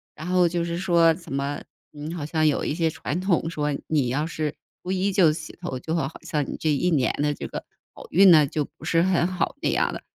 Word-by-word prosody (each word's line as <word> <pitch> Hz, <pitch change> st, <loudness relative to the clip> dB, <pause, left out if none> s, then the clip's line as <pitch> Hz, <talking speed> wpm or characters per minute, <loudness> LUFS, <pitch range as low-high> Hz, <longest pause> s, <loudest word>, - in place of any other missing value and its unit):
然 155 Hz, -, -8 dB
后 180 Hz, -1 st, +3 dB
就 170 Hz, 0 st, -1 dB
是 170 Hz, 0 st, -3 dB
说 170 Hz, -3 st, +4 dB
怎 170 Hz, -6 st, -10 dB
么， 140 Hz, +1 st, -2 dB, 0.3 s
你 150 Hz, +2 st, -7 dB
好 155 Hz, -4 st, -4 dB
像 155 Hz, 0 st, +1 dB
有 145 Hz, -, +1 dB
一 -, -, -1 dB
些 165 Hz, -1 st, +1 dB
传 160 Hz, +1 st, -4 dB
统 175 Hz, -3 st, +1 dB
说， 150 Hz, -3 st, -1 dB
你 145 Hz, -5 st, +1 dB
要 140 Hz, +5 st, 0 dB
是 155 Hz, -2 st, -3 dB, 0.3 s
初 180 Hz, -, -7 dB
1 190 Hz, +1 st, +1 dB
就 175 Hz, -6 st, +4 dB
洗 155 Hz, -1 st, -8 dB
头， 155 Hz, -8 st, -4 dB
就 160 Hz, -, -4 dB
好 135 Hz, -5 st, 0 dB
好 160 Hz, -, -10 dB
像 150 Hz, -3 st, -1 dB
你 -, -, -4 dB
这 155 Hz, -, +1 dB
一 175 Hz, +5 st, +1 dB
年 140 Hz, -6 st, +2 dB
的 150 Hz, 0 st, +1 dB
这 -, -, -7 dB
个 -, -, -7 dB, 0.3 s
好 -, -, -12 dB
运 190 Hz, +1 st, +7 dB
呢， 150 Hz, -3 st, +6 dB
就 150 Hz, 0 st, -2 dB
不 -, -, -11 dB
是 165 Hz, 0 st, +3 dB
很 180 Hz, -2 st, +2 dB
好 185 Hz, +8 st, -2 dB
那 -, -, +1 dB
样 -, -, +1 dB
的， -, -, -7 dB
160 Hz, 265 characters per minute, -24 LUFS, 150-175 Hz, 0.3 s, 运